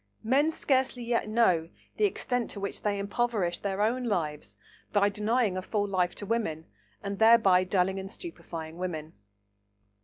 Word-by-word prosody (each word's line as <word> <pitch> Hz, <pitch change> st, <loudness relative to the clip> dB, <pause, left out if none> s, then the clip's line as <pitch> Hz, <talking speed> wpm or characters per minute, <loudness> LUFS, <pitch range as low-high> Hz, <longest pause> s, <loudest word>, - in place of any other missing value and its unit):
Men 270 Hz, +7 st, +3 dB
scarcely 265 Hz, -5 st, 0 dB
yet 235 Hz, -2 st, 0 dB
know 185 Hz, -8 st, +3 dB, 0.3 s
the 425 Hz, -, +3 dB
extent 250 Hz, -, -1 dB
to 200 Hz, -, -5 dB
which 200 Hz, 0 st, -4 dB
they 205 Hz, -1 st, 0 dB
impoverish 200 Hz, -2 st, -1 dB
their 200 Hz, 0 st, -1 dB
own 245 Hz, +3 st, 0 dB
lives 150 Hz, -, -2 dB, 0.3 s
by 205 Hz, -1 st, +3 dB
denying 210 Hz, 0 st, +1 dB
a 185 Hz, -, -2 dB
full 205 Hz, +2 st, -1 dB
life 180 Hz, -2 st, 0 dB
to 205 Hz, -, -6 dB
women, 190 Hz, -8 st, -2 dB, 0.4 s
and 200 Hz, -1 st, -4 dB
thereby 220 Hz, -5 st, +6 dB
dulling 190 Hz, +1 st, +1 dB
and 190 Hz, 0 st, -6 dB
stupefying 165 Hz, -, -8 dB
women. 160 Hz, -4 st, -4 dB
200 Hz, 155 wpm, -29 LUFS, 180-235 Hz, 0.4 s, thereby